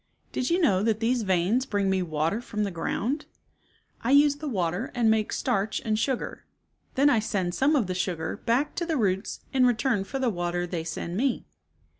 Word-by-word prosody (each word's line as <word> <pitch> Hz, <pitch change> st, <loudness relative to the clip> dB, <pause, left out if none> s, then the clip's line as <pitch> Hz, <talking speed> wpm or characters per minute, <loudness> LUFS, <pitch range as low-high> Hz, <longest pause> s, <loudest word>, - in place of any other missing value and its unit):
"Did 255 Hz, -, -1 dB
you 345 Hz, +2 st, +2 dB
know 200 Hz, -, +3 dB
that 220 Hz, 0 st, +1 dB
these 235 Hz, +2 st, +1 dB
veins 195 Hz, +6 st, +1 dB
bring 205 Hz, -4 st, 0 dB
me 190 Hz, -1 st, +2 dB
water 165 Hz, +5 st, -1 dB
from 210 Hz, -3 st, -3 dB
the 200 Hz, -, -2 dB
ground? 240 Hz, -, -2 dB, 0.8 s
I 235 Hz, -, 0 dB
use 285 Hz, +1 st, +5 dB
the 305 Hz, +1 st, -6 dB
water 180 Hz, 0 st, -1 dB
and 230 Hz, -2 st, +3 dB
make 220 Hz, -1 st, +1 dB
starch 200 Hz, +1 st, 0 dB
and 215 Hz, -1 st, +1 dB
sugar. 255 Hz, +1 st, -2 dB, 0.5 s
Then 275 Hz, +2 st, +4 dB
I 280 Hz, -6 st, +4 dB
send 190 Hz, -5 st, -1 dB
some 280 Hz, -, +3 dB
of 255 Hz, -7 st, +2 dB
the 185 Hz, -, -3 dB
sugar 175 Hz, -3 st, -2 dB
back 245 Hz, +5 st, 0 dB
to 345 Hz, -, 0 dB
the 320 Hz, -3 st, 0 dB
roots 195 Hz, -3 st, -1 dB
in 255 Hz, -2 st, +5 dB
return 235 Hz, -3 st, +1 dB
for 270 Hz, -, -5 dB
the 260 Hz, -3 st, +1 dB
water 175 Hz, -1 st, -2 dB
they 175 Hz, -2 st, -3 dB
send 170 Hz, +2 st, -4 dB
me. 260 Hz, +2 st, 0 dB
220 Hz, 200 wpm, -27 LUFS, 185-260 Hz, 0.8 s, use